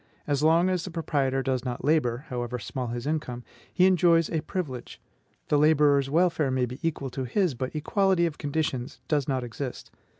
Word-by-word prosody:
As 145 -1 0
long 165 +3 +4
as 185 -2 0
the 185 - -5
proprietor 140 -5 -1
does 130 -2 -1
not 125 -1 -4
labor, 140 -4 +1
however 125 0 -3
small 125 +4 -4
his 120 +1 -4
income, 145 -5 -3 0.3
he 185 - +4
enjoys 170 -3 +4
a 160 - 0
privilege; 140 -11 -5 0.5
the 145 - +3
laborer's 145 -2 +4
welfare 160 -2 +2
may 130 -1 +1
be 125 +3 -8
equal 150 -5 -2
to 130 +1 -4
his, 165 - +1
but 130 +4 -5
equality 185 +3 +2
of 160 -3 -4
conditions 145 -3 -2
does 145 -3 +1
not 130 -3 -1
exist. 125 +2 -6
145 Hz, 180 wpm, -27 LUFS, 130-165 Hz, 0.5 s, long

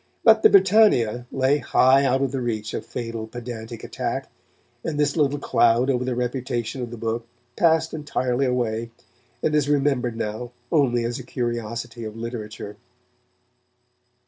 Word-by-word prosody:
But 220 -1 +6
the - - +7
Britannia 185 - +4
lay 135 +2 +2
high 135 +1 +4
out 135 +1 +2
of 135 - -1
the 135 -2 -2
reach 110 -3 -3
of - - -3
fatal 115 -2 -5
pedantic 115 -1 -7
attack, - - -4 0.5
and 150 -2 -3
this 145 -1 +2
little 145 -3 +2
cloud 120 -1 +3
over 125 -1 0
the 125 -1 -2
reputation 125 0 -2
of 120 - -4
the 120 - -8
book 115 +1 -3 0.3
passed 160 -1 +2
entirely 135 -3 -1
away, 115 -2 -1 0.5
and 155 - +1
is 150 -2 +2
remembered 135 -5 +1
now 115 +2 -4 0.2
only 125 -6 +2
as 120 +2 -3
a - - -7
curiosity 120 -1 -4
of 110 0 -7
literature. 110 -3 -6
125 Hz, 150 wpm, -23 LUFS, 115-140 Hz, 0.5 s, the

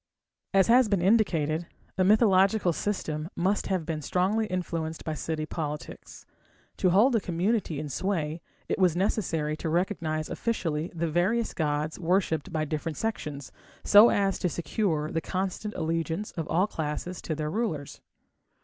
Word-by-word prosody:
As 195 -1 +5
has 240 -1 +5
been 195 -4 +1
indicated, 170 -6 +2 0.3
a 185 - +2
mythological 195 -2 +4
system 160 -5 -3
must 190 +4 0
have 185 -4 -1
been 155 -2 -3
strongly 195 +8 +1
influenced 165 -4 -3
by 155 - -2
city 155 +1 -3
politics. 150 -1 -6 0.5
To 185 - +3
hold 220 +8 +4
a - - +4
community 180 -2 -1
in 155 - -4
sway, 160 +1 -2 0.3
it - - -1
was 180 -3 +4
necessary 165 -6 0
to 160 - -3
recognize 165 -3 -1
officially 165 -8 -2
the 170 0 -1
various 215 +8 +1
gods 150 0 -1
worshipped 180 -1 0
by 155 -2 -1
different 155 +1 -3
sections, 150 - -4 0.3
so 210 +3 +8
as 195 -1 +1
to 180 - 0
secure 165 -3 -1
the 165 - -1
constant 190 +4 -3
allegiance 165 +4 -2
of 165 -2 -4
all 180 +4 +2
classes 165 0 -4
to 155 - -3
their 150 0 -3
rulers. 180 -10 -3
175 Hz, 150 wpm, -27 LUFS, 155-200 Hz, 0.5 s, so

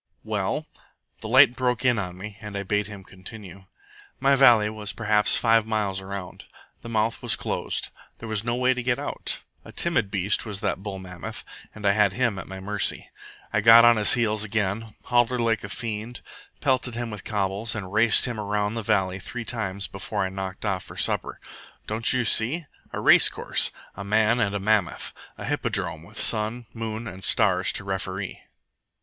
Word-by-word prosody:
"Well?" - - -2 0.5
The - - -7
light 130 +1 +6
broke 125 0 -1
in 120 -3 +3
on 90 -2 -5
me, 100 +2 -8
and 105 -2 -6
I 100 - -3
bade 105 +1 -1
him 100 -2 -10
continue. 95 0 -11 0.5
"My 140 +1 +4
valley 120 -6 +6
was 105 -1 -5
perhaps 105 -2 +3
five 115 -1 +3
miles 105 -3 -1
around. 95 -1 -7 0.4
The 115 - -9
mouth 110 0 0
was - - +2
closed. - - -3 0.3
There 115 - -9
was 110 -1 -1
no 120 0 -1
way 130 +1 +2
to 125 - -4
get 120 0 0
out. - - -3 0.2
A - - -12
timid 165 -12 0
beast 100 +1 0
was 105 -4 -5
that 95 - -1
bull 100 -1 -5
mammoth, 90 -2 -8 0.3
and 110 -1 -8
I 100 - +5
had 100 -1 +3
him 115 -3 0
at 90 - -8
my 95 0 -8
mercy. 100 +1 -1 0.4
I 105 - +2
got 115 +2 +9
on 120 -1 +6
his 105 -1 +4
heels 110 -3 +1
again 105 +1 -2
hollered 120 0 +2
like 115 -2 +1
a 100 - -6
fiend, 115 +3 -5 0.4
pelted 130 -4 0
him 120 -1 -4
with 105 -2 -8
cobbles, 105 +3 -1
and 100 -3 -6
raced 110 +1 +4
him 120 -3 -4
around 105 0 -1
the 115 - -3
valley 95 -4 0
three 120 +5 -7
times 100 -4 -3
before 100 +1 -3
I - - -2
knocked 95 +1 -6
off 95 -3 -1
for - - -12
supper. - - 0 0.5
Don't 110 +2 +2
you 125 -2 +1
see? 130 +10 +2 0.3
A - - -4
race - - +6
course! - - +1 0.2
A 100 - -6
man 110 +3 +2
and 100 -3 0
a - - -1
mammoth! 100 -5 0 0.2
A - - -7
hippodrome, 80 - 0
with 100 +7 -10
sun, 110 +2 +2
moon, 115 0 -5
and 95 -3 -9
stars - - +3
to - - -1
referee! 95 0 -4
105 Hz, 190 wpm, -25 LUFS, 100-115 Hz, 0.5 s, got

